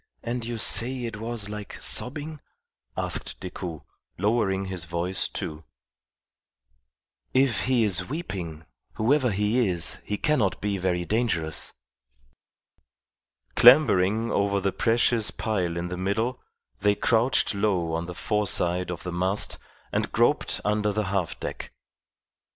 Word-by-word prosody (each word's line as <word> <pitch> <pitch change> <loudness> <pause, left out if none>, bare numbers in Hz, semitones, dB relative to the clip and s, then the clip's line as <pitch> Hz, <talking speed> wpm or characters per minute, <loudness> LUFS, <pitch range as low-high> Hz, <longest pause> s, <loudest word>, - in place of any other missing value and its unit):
"And 120 0 -3
you 120 0 -4
say 125 +3 +2
it 115 -2 -5
was 115 -1 -3
like 105 -1 -7
sobbing?" 150 +4 +1 0.6
asked - - -2
Decoud, 90 -3 -6 0.4
lowering 100 -3 +1
his 95 -3 -4
voice, 85 +3 -1
too. 75 0 -5 1.7
"If 130 -3 +3
he 125 -3 +3
is 100 -2 +1
weeping, 90 - -5 0.3
whoever 130 +3 +2
he 105 +4 +1
is 85 -3 -1
he 105 - -3
cannot 130 - +1
be 100 -1 -1
very 90 -1 0
dangerous." 90 -8 -1 1.8
Clambering 115 -5 +6
over 100 0 +1
the 95 0 -1
precious 115 -1 +2
pile 90 -6 -2
in 85 +1 -3
the 90 - -4
middle, 110 +7 -1 0.4
they 105 +1 +3
crouched 115 +4 +2
low 95 -5 0
on 85 +1 -2
the 90 - -7
foreside 90 -3 0
of 90 -1 -5
the 90 - -4
mast 95 +3 0 0.3
and - - -1
groped - - +2
under 105 0 +1
the 105 +1 -1
half 90 -5 -1
deck. - - -6
105 Hz, 130 wpm, -26 LUFS, 90-115 Hz, 1.8 s, Clambering